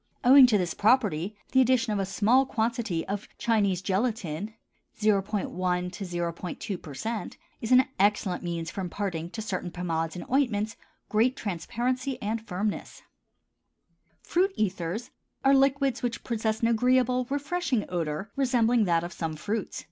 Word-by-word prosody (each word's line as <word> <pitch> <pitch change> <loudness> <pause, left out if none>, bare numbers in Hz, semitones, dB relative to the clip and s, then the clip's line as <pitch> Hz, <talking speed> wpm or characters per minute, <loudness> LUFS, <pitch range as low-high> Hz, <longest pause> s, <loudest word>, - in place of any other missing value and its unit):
Owing 260 +1 +9
to 220 -4 +3
this 175 -4 -1
property 210 -5 +2
the 260 - +5
addition 245 -3 +2
of 205 - -1
a 195 - -1
small 220 +7 +3
quantity 225 -8 -1
of 200 +1 -4
Chinese 200 -5 +1
gelatin 205 -1 -2 0.4
(0·1 210 -1 +1
0·2%) 180 - -3 0.3
is 225 - -4
an 255 +1 +7
excellent 200 -2 +2
means 170 -2 -3
for 195 - -4
imparting 175 -2 -3
to 220 +4 -6
certain 185 -4 -3
pomades 165 -2 -2
and 180 - -6
ointments 230 -5 +1 0.3
great 235 +5 +2
transparency 245 +7 -2
and 220 +2 -2
firmness. 200 +3 -3 1.2
FRUIT 375 +3 +2
ETHERS 195 +3 -2 0.3
are 270 - +6
liquids 275 -1 +3
which 240 -2 -3
possess 220 -2 -1
an 230 - +3
agreeable, 250 +1 +2
refreshing 285 - -1
odor 170 +3 -3
resembling 245 -4 +3
that 170 -2 +2
of 175 +1 -6
some 165 -2 -3
fruits. 205 +6 -3
210 Hz, 135 wpm, -27 LUFS, 180-245 Hz, 1.2 s, Owing